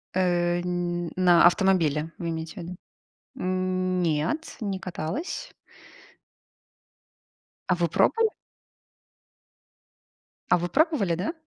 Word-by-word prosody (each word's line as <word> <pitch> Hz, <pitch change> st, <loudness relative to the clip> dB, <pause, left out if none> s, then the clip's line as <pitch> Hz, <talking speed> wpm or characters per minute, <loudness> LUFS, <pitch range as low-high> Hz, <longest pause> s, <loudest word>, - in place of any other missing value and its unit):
Э. 175 Hz, -1 st, +1 dB
Ни 175 Hz, -1 st, -2 dB
на 175 Hz, -2 st, +5 dB
автомобиле, 165 Hz, -4 st, +3 dB
вы 170 Hz, -, -4 dB
имеете 165 Hz, +3 st, -5 dB
ввиду? 175 Hz, +2 st, -7 dB, 0.6 s
Нет, 185 Hz, -, -1 dB
не 195 Hz, -3 st, -2 dB
каталась. 190 Hz, -, -5 dB, 2.2 s
А 180 Hz, -, +4 dB
вы 175 Hz, -1 st, +1 dB
пробовали? 450 Hz, -, +2 dB, 2.2 s
А -, -, +5 dB
вы 175 Hz, +1 st, -3 dB
пробовали, 290 Hz, -, +2 dB
да? 190 Hz, -, -2 dB
180 Hz, 90 wpm, -26 LUFS, 170-190 Hz, 2.2 s, на